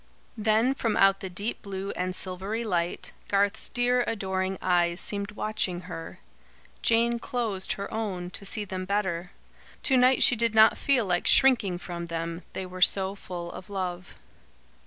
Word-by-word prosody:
Then 220 +3 +2
from 230 -5 -1
out 195 0 +5
the 190 - -6
deep 200 +6 -4
blue 195 0 -5
and 180 0 -3
silvery 190 +5 -2
light, 175 -5 -2 0.2
Garth's 200 +1 +1
dear 245 0 +2
adoring 190 -2 -2
eyes 175 -1 +1
seemed 200 0 -2
watching 210 -5 -2
her. 165 -2 -8 0.6
Jane 235 +1 +2
closed 225 -6 -2
her 200 - -6
own, 190 -5 -3
to 200 - -7
see 205 +2 -2
them 185 -1 -5
better. 185 -3 -1 0.5
To 265 - +4
night 255 +1 +5
she 245 - +6
did 230 -1 0
not 220 0 +7
feel 265 -5 +1
like 175 -2 0
shrinking 230 -9 +5
from 170 -1 -6
them, 165 +1 -4
they 190 - -4
were 185 0 -9
so 190 +1 +4
full 175 -3 -7
of 185 - -10
love. 180 -3 -4
195 Hz, 160 wpm, -27 LUFS, 180-220 Hz, 0.6 s, not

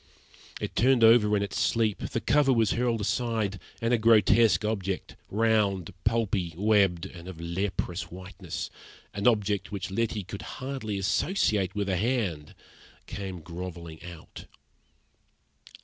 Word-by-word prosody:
It - - -5
turned 125 -1 +4
over 110 -2 +6
in 100 - 0
its 100 - -3
sleep, 110 -4 +1
the - - -3
cover 140 +2 +3
was 115 -4 +3
hurled 120 -2 0
aside, 110 -2 -1 0.2
and 115 +1 +2
a 120 - +3
grotesque 110 0 +5
object, 100 -3 -3
round, 105 -5 +1
pulpy, 105 -7 0
webbed, 100 -4 +3
and 85 0 -10
of 90 -3 -8
leprous 90 +1 -3
whiteness 90 -1 -7 0.4
an 100 +4 0
object 105 -4 +1
which 95 -2 -4
Letty 110 0 -1
could 100 +2 -8 0.2
hardly 130 -6 -4
associate 105 - +1
with 100 -1 -1
a 95 -2 0
hand 100 - -1 0.5
came 95 -4 -6
grovelling 85 -1 -8
out. 85 -2 -10
100 Hz, 135 wpm, -28 LUFS, 90-115 Hz, 0.5 s, over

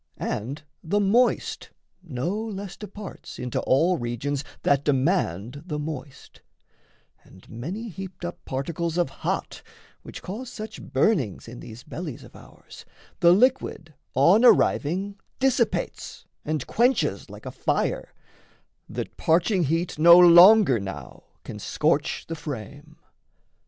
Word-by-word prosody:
And 130 +9 -4 0.2
the 200 +5 0
moist 225 +5 +1 0.3
no 160 -1 -3
less 205 -3 -5
departs 210 -2 -10
Into 125 -1 -3
all 170 +7 +2
regions 130 +4 -3 0.2
that 140 0 +2
demand 135 - 0
the 150 -4 -3
moist; 150 -3 -8 0.8
And 95 - -18
many 180 - -6
heaped 190 -1 -8
up 175 - -7
particles 165 +5 -3
of 175 -6 +1
hot, - - -3 0.4
Which - - -10
cause 230 +7 -6
such 215 0 -8
burnings 135 - 0
in 120 +1 -9
these 115 +2 -11
bellies 155 -6 -7
of - - -16
ours, - - -14 0.4
The 170 - +6
liquid 200 -7 +1 0.2
on 170 - +5
arriving 195 - +3 0.2
dissipates 255 -3 -1 0.2
And 155 -4 -2
quenches 245 +3 +1
like - - -12
a - - -5
fire, - - -1 0.8
that - - -6
parching 175 +2 +2
heat 165 +2 -1
No 170 +2 +9
longer 180 - +8
now 85 -10 -8 0.2
can - - -8
scorch - - 0
the 165 - -4
frame. 145 +2 -8
165 Hz, 125 wpm, -25 LUFS, 135-195 Hz, 0.8 s, No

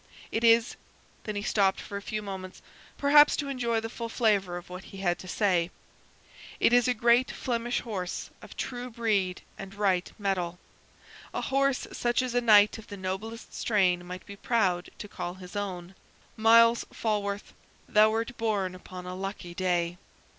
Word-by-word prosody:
It 225 - -1
is" 230 0 +4 0.5
then 215 - -4
he 205 - -3
stopped 195 -3 +2
for 200 - -8
a 200 - -3
few 215 +1 -4
moments, 190 -2 -7 0.3
perhaps 295 +1 +6
to 285 -2 -2
enjoy 240 -4 0
the 225 - -4
full 230 0 -6
flavor 200 -6 +1
of 175 - -10
what 180 +1 -9
he 195 - -11
had 175 -2 0
to 185 - -10
say 180 -3 +1 0.9
"it 235 - +4
is 245 +1 +5
a 250 - +2
great 240 +3 +4
Flemish 240 -1 -2
horse 190 -6 -5
of - - -13
true 245 -1 -4
breed 210 -6 0 0.2
and 195 -1 -8
right 190 -3 +1
mettle; 185 -4 -1 0.8
a - - -1
horse 275 -1 +1
such 240 +1 0
as 250 -2 -3
a 245 - +2
knight 210 -2 +6
of 220 - -13
the 205 - -8
noblest 195 +5 -5
strain 185 -5 +2
might 180 +1 -8
be 200 - -9
proud 195 -5 0
to - - -7
call 175 -3 -5
his 185 +1 -11
own. 185 -3 -4 0.4
Myles 230 +1 +6
Falworth, 205 -2 -2 0.3
thou 215 -2 +5
wert 225 +2 -2
born 205 -5 0
upon 185 0 -10
a 180 - -5
lucky 190 -2 -6
day!" 175 -1 0
205 Hz, 175 wpm, -28 LUFS, 185-230 Hz, 0.9 s, perhaps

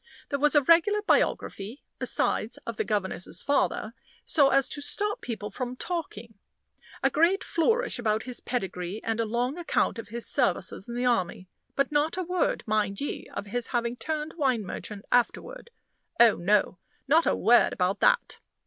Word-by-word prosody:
There 280 - -1
was 295 +2 +3
a 295 - +6
regular 380 +8 +4
biography, 220 - 0 0.2
besides, 220 - 0
of 230 -2 -5
the - - +1
governess's 190 -4 -2
father, 255 -5 0 0.3
so 280 -4 +4
as 275 -1 +3
to 290 - -4
stop 415 +8 -2
people 215 -3 -5
from 250 -1 -4
talking 235 - -5 0.6
a - - +3
great 340 +5 +3
flourish 450 - +1
about 220 -2 0
his 250 -1 -5
pedigree, 190 -4 -4
and 225 0 -2
a 230 - +1
long 245 +8 -2
account 325 -8 0
of 230 - -7
his 235 +2 -5
services 190 -4 0
in 235 - -5
the 245 +1 -1
army; 185 -6 0 0.3
but 275 +1 +1
not 300 +3 +1
a 370 - -1
word, 360 0 0
mind 210 -2 0
ye, 285 - -4
of - - -4
his 235 +4 -3
having 235 -1 -1
turned 310 +3 -4
wine 255 -8 +1
merchant 205 +2 -7
afterward. 475 - 0 0.5
Oh, 235 -2 +7
no 190 0 +1 0.3
not 320 +4 +4
a - - +3
word 240 +1 +4
about 185 +2 0
that! - - +2
245 Hz, 170 wpm, -27 LUFS, 215-300 Hz, 0.6 s, Oh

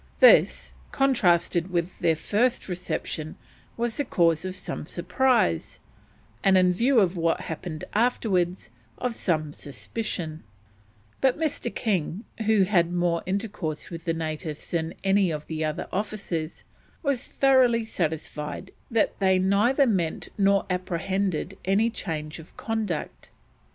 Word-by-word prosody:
This, - - +6 0.2
contrasted 185 -9 +2
with 175 0 -2
their 165 - +3
first 235 +10 0
reception, 175 -3 -4 0.4
was 235 -1 -1
the 285 - +1
cause 170 - +2
of 185 0 -4
some - - -5
surprise, 200 - +1 0.6
and, 190 -1 +5
in 180 -1 +4
view 240 +6 +3
of 190 -3 +2
what 165 0 +1
happened 160 0 -6
afterwards, 195 - +1 0.3
of 250 -1 -2
some 155 -8 -1
suspicion; 160 +1 -5 0.8
but 265 -2 +3
Mr. 310 -2 -1
King, 195 -2 -1 0.2
who 220 -3 +5
had 175 -3 +2
more 175 -1 +1
intercourse 195 -6 -3
with 165 0 -7
the 165 - +1
natives 155 -1 -5
than 165 -1 -1
any 195 -1 +3
of 150 -2 -4
the 160 -1 -3
other 155 0 -2
officers, 190 -6 -3 0.4
was 280 -3 0
thoroughly 255 -4 +4
satisfied 155 -6 -4 0.2
that 225 -3 +1
"they 190 -1 +4
neither 205 +9 +3
meant 185 -9 -1
nor 200 -1 +3
apprehended 185 0 -2
any 205 +5 +2
change 155 -6 -5
of 160 - -15
conduct." 220 -8 -3
185 Hz, 130 wpm, -26 LUFS, 165-220 Hz, 0.8 s, This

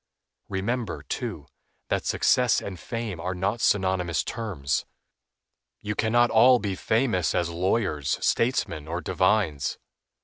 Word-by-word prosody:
Remember, 110 +4 -2
too, - - -5 0.4
that - - -1
success 125 -3 +3
and 95 -3 -7
fame 115 -7 -5
are 90 +2 -3
not 100 +5 -1
synonymous 95 -4 +1
terms. 95 - -2 1.0
You 105 - -3
can 110 +1 -1
not 120 0 +4
all 125 +3 +7
be 100 -4 -3
famous 110 -2 +1
as 85 -1 0
lawyers, 85 - 0
statesmen, 105 - 0
or 85 +2 -3
divines. 95 -9 +1
100 Hz, 125 wpm, -26 LUFS, 90-115 Hz, 1.0 s, all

